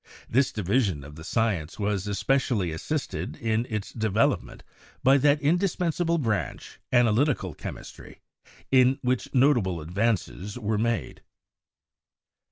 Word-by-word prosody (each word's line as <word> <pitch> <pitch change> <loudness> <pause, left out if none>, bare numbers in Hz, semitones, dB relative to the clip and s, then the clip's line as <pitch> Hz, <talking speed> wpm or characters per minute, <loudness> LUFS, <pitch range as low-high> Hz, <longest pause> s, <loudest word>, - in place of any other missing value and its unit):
This 130 +3 +2
division 100 - 0
of 70 +1 -11
the 80 +1 -10
science 95 -5 -1
was 105 -1 -1
especially 105 -3 0
assisted 145 - -3
in 115 +1 -1
its 105 -3 -4
development 110 -1 0 0.4
by 135 +2 +6
that 145 +2 +4
indis 175 +5 +1
pensable 170 -1 0
branch, 110 -7 -3
analytical 120 - +2
chemistry, - - -9 0.5
in 130 0 +5
which 125 -1 -1
notable 120 - +3
advances 100 +3 -2
were 110 -2 -1
made. 115 +1 -2
115 Hz, 115 wpm, -26 LUFS, 100-135 Hz, 0.5 s, by